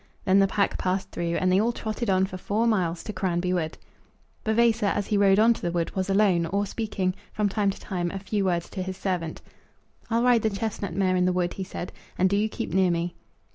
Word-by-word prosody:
Then 190 +1 +5
the 195 - +5
pack 200 +1 0
passed 185 +1 -1
through, 170 0 -2
and 185 0 +2
they 190 +2 +4
all 230 +2 +2
trotted 225 -1 -3
on 190 0 +3
for 190 - -7
four 210 +5 0
miles, 180 -7 +1
to 215 - -5
Cranby 180 -1 0
Wood. 160 -3 -2 0.7
Vavasor, 220 -1 +3
as 205 0 0
he 210 - -1
rode 200 -1 +5
on 225 +2 +6
to - - -10
the 175 - -1
wood, 170 -1 -2
was 190 0 -1
alone, 195 -4 +3
or 200 +4 0
speaking, 195 -3 -2 0.2
from 210 -1 0
time 200 0 +1
to 195 - -4
time, 175 -3 -3
a 195 - -5
few 200 +1 -1
words 175 -2 0
to 190 - -4
his 185 0 -4
servant. 175 -5 -3 0.7
"I'll 230 +1 +2
ride 245 -2 +5
the 220 - +2
chestnut 200 -3 -3
mare 185 -1 +2
in 180 0 +2
the 185 - +3
wood," 175 -1 0
he 195 - -4
said, 180 -1 -6 0.3
"and 185 +1 +3
do - - +3
you 210 +2 +1
keep 170 - -5
near 190 -1 +4
me." 170 0 -1
190 Hz, 240 wpm, -26 LUFS, 180-210 Hz, 0.7 s, on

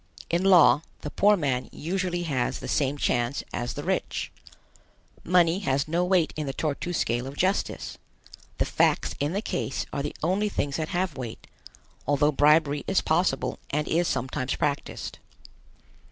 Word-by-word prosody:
In 170 +2 +1
law, 180 -6 +6 0.2
the 150 - -5
poor 210 +1 +4
man 135 -6 -1
usually 175 +1 -2
has 135 -7 -1
the - - -7
same 145 -1 0
chance 120 -1 0
as 120 -2 -3
the - - -5
rich. - - -2 0.9
Money 175 0 +3
has 140 -7 0
no 170 +3 +1
weight 180 -2 +2
in 155 -2 -3
the 135 - -2
Tor 155 0 -1
tu 175 - -5
scale 120 -6 -1
of 140 +2 -8
justice. 190 +2 -1 0.6
The - - +1
facts - - +1
in 145 +4 0
the 200 +3 -1
case 180 - -2
are 140 - -1
the 145 - -4
only 195 +5 +1
things 145 -7 -2
that 155 -1 -3
have 175 -4 -1
weight, 120 -4 -7 0.6
although 145 +1 +3
bribery 150 0 +3
is 190 - +2
possible 160 -4 0
and 150 +1 -1
is 170 +1 +1
sometimes 130 +1 -2
practiced. 145 -1 -3
150 Hz, 165 wpm, -26 LUFS, 140-175 Hz, 0.9 s, law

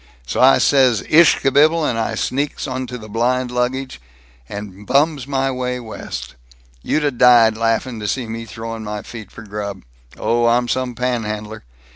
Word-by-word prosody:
So 60 - -2
I 130 +1 +7
says 130 -6 +3
'ish 160 0 +6
kabibble,' 150 +4 +4
and 120 - 0
I 110 0 -1
sneaks 140 +5 -2
onto 130 -1 -4
the 110 -2 -11
blind 125 +3 0
baggage, 125 - -2 0.5
and 100 -1 -8
bums 145 -2 +2
my 135 -1 0
way 125 -1 -3
West. 65 - -7 0.5
You'd 155 - 0
'a' 145 - +2
died 120 -3 +5
laughing 115 +1 -1
to 105 - -4
seen 120 0 -2
me 115 0 -5
throwing 115 0 -7
my 105 0 -5
feet 110 -4 -9
for 115 - -12
grub. 100 -2 -6 0.3
Oh, 120 0 +1
I'm 120 +1 +2
some 125 -1 -2
panhandler! 110 - -3
120 Hz, 165 wpm, -19 LUFS, 110-130 Hz, 0.5 s, I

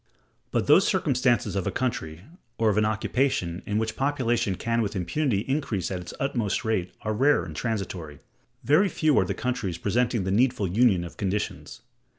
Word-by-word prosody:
But - - 0
those - - +5
circumstances 120 -6 +1
of 95 - -1
a - - 0
country, 85 -11 -3 0.4
or 110 -1 +3
of 105 - -2
an 105 - +2
occupation, 110 -5 0
in 105 - 0
which 110 0 -1
population 125 -8 0
can 115 +4 -1
with 105 -1 -2
impunity 100 - 0
increase 115 - -2
at 95 - -2
its 90 - -8
utmost 120 -8 -1
rate, 95 -5 -1
are 110 - -1
rare 140 +7 +3
and 80 -3 -8
transitory. 90 - -4 0.5
Very 185 +8 +4
few 155 -4 +2
are - - +2
the - - -3
countries 125 -9 -2
presenting 115 +3 0
the 95 - -2
needful 120 -1 +2
union 100 -1 +3
of 85 - -9
conditions. 100 +1 -3
110 Hz, 175 wpm, -26 LUFS, 95-125 Hz, 0.5 s, those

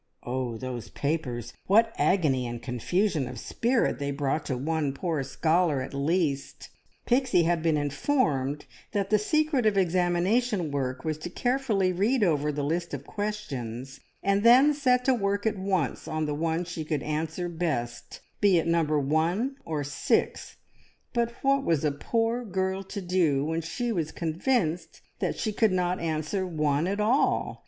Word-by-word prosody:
Oh, 125 -2 -3
those 125 -2 -6
papers, 125 -6 -3
what 225 +3 +4
agony 140 -10 +2
and 120 0 -5
confusion 145 - 0
of 125 0 -7
spirit 235 - 0
they 140 0 -2
brought 140 +2 -1
to 130 - -1
one 150 +1 -1
poor 160 0 -2
scholar 155 +3 +1
at 130 - -8
least! 140 0 -1 0.4
Pixie 250 -8 +3
had 170 0 +1
been 160 -2 +2
informed 145 - 0 0.3
that 200 -1 -1
the 215 - +5
secret 300 +1 +1
of 205 -2 +2
examination 180 +2 +1
work 130 0 -3
was 155 -1 -2
to 165 - -5
carefully 230 -5 0
read 215 +7 +2
over 150 -5 +2
the 145 0 -3
list 170 +4 -1
of - - -9
questions, 135 - -5 0.2
and 200 +1 +2
then 255 +6 +7
set 250 -3 +2
to 265 - +4
work 200 -3 -1
at 215 -3 0
once 185 -7 -1
on 155 0 -1
the 150 - -2
one 160 +3 -1
she 165 -2 -5
could 150 -2 -2
answer 160 +3 -2
best, 150 -9 -3 0.2
be 200 -4 +5
it 165 - +1
number 165 -3 +2
one 165 - 0
or 155 -3 -2
six; 145 +1 -1 0.6
but 235 -1 +1
what 275 0 +3
was 160 - +1
a 150 - +2
poor 230 +10 -1
girl 190 -2 -1
to 195 +1 -6
do 170 -6 +2
when 160 +1 -1
she 235 +9 -3
was 165 -7 -1
convinced 165 -1 -1 0.2
that - - -1
she 215 - -2
could 220 0 +3
not 180 0 0
answer 160 +3 -2
one 150 -1 0
at 200 +2 -1
all? 230 +7 +1
170 Hz, 165 wpm, -27 LUFS, 145-205 Hz, 0.6 s, then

